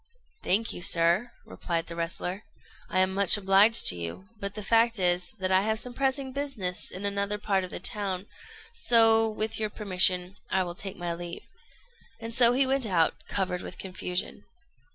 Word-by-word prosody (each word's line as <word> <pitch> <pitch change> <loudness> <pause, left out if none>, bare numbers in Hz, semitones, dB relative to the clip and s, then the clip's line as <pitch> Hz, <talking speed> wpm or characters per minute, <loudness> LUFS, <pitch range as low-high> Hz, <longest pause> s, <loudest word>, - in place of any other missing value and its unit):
"Thank 220 +5 +1
you, - - -8
sir," 175 +7 +3
replied 165 -2 -4
the 170 - -9
wrestler, 180 +4 -4 0.5
"I 185 - +1
am 185 0 +1
much 200 +1 +3
obliged 200 +3 +4
to - - +7
you; 85 +3 -7
but 200 0 -5
the 210 - -6
fact 230 +2 +2
is, 180 -1 0
that 190 -3 -3
I 190 0 +4
have 220 +2 -1
some 245 +2 -6
pressing 270 0 -1
business 255 -11 -2
in 190 +2 -7
another 200 +1 -1
part 195 -2 -1
of 185 - -6
the - - -6
town, 195 -3 -1 0.5
so, 225 - +5
with 215 +1 -3
your 215 -1 -1
permission, 185 -2 0
I 190 0 +1
will 175 -1 -6
take 195 +2 -7
my 175 -1 -3
leave;" 170 0 -8 0.7
and 230 0 -7
so 240 0 +6
he 270 +2 +4
went 265 -2 0
out, 170 -5 +2
covered 185 -2 -2
with - - -9
confusion. 180 -1 -5
195 Hz, 180 wpm, -27 LUFS, 180-225 Hz, 0.7 s, to